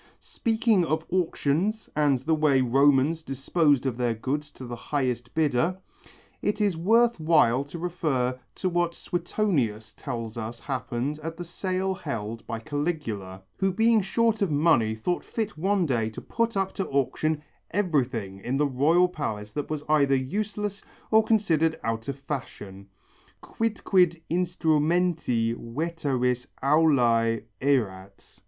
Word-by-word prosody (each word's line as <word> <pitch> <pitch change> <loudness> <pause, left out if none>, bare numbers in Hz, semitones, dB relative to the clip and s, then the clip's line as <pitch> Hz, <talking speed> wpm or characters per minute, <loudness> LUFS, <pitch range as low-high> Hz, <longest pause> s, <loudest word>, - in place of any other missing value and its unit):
Speaking 225 -4 +1
of 160 0 -1
auctions 180 +3 0
and 145 -3 +3
the 160 +4 +1
way 150 -3 +3
Romans 135 +5 +3
disposed 140 0 +1
of 125 -3 -1
their 120 -2 0
goods 145 +6 -3
to 130 - -9
the 120 0 -5
highest 125 -2 -2
bidder, 160 +3 +1 0.6
it 205 +1 -1
is 205 -4 +2
worth 230 +6 +3
while 150 -6 +4
to 145 +4 -8
refer 140 -7 -1 0.2
to 185 - -2
what 175 -1 0
Suetonius 165 - -1
tells 115 -1 -5
us 115 +1 -6
happened 130 +2 -3
at 165 +1 -5
the 175 - -5
sale 185 +2 -2
held 115 - -5
by 115 - -3
Caligula, 115 - -4
who 190 0 +1
being 225 +3 +3
short 225 +3 +1
of 200 - +2
money 145 -8 +3
thought 175 +11 -2
fit 220 -2 -3
one 190 +3 +1
day 115 -6 0
to 110 - -8
put 230 -2 -1
up 195 -1 0
to 195 - -3
auction 150 +3 0 0.3
everything 130 - -1
in 125 +7 -2
the 150 - +3
royal 150 +7 +3
palace 105 -11 -4
that 145 +3 -4
was 155 -1 -3
either 140 -3 +4
useless 205 +9 -2 0.3
or 220 0 +6
considered 165 -8 +2
out 115 0 -2
of 140 -1 -3
fashion, 105 -9 -7 0.6
quidquid 190 -6 +1
instrumenti 165 -7 +1
veteris 125 -2 -2 0.2
aulæ 120 -7 +3 0.2
erat. 100 -8 -2
150 Hz, 140 wpm, -26 LUFS, 125-180 Hz, 0.6 s, or